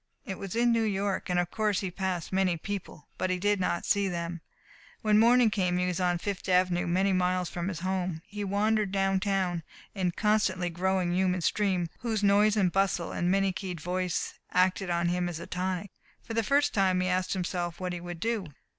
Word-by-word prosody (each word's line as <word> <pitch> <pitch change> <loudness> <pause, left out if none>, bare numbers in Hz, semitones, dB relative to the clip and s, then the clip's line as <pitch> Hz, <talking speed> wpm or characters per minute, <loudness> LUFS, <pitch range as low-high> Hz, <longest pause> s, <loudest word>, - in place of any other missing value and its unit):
It 190 - -5
was 195 0 -5
in 240 +1 +3
New 230 -1 +2
York, 200 -3 -1
and 180 0 +2
of 175 0 -1
course 210 -3 0
he 190 -3 -3
passed 185 -2 -3
many 185 -2 +2
people. 185 -4 -6
But 185 - 0
he 185 - +1
did 205 +2 +1
not 180 -1 -1
see 200 -1 +2
them. 170 -1 -4 0.6
When 215 -1 +4
morning 235 0 +5
came 180 -3 +1
he 180 - +1
was 180 0 -1
on 180 -1 +2
Fifth 195 +2 -4
Avenue 180 -1 +2
many 190 +3 +2
miles 180 -1 +1
from 175 0 -3
his 175 -4 -4
home. 185 -3 -2
He 205 0 -6
wandered 205 +1 +1
downtown 195 -2 +1 0.3
in 190 -3 -1
a - - +1
constantly 190 -3 +1
growing 180 0 0
human 185 0 +1
stream 185 -1 +1
whose 220 -3 -2
noise 205 +1 +4
and 185 -4 +3
bustle 195 -3 0
and 175 - 0
many 195 +1 +2
keyed 185 -2 -5
voice 180 +1 -2
acted 185 +1 +2
on 170 0 +1
him 175 0 0
as 165 -2 -5
a 170 - -7
tonic. 185 +2 -3 0.3
For 225 - -6
the 230 - +2
first 280 +6 +2
time 190 -2 +2
he 185 - 0
asked 185 0 0
himself 175 -2 -3
what 180 -1 -3
he 175 - -5
would 175 -1 -7
do. 225 -2 -1
185 Hz, 210 wpm, -29 LUFS, 180-200 Hz, 0.6 s, morning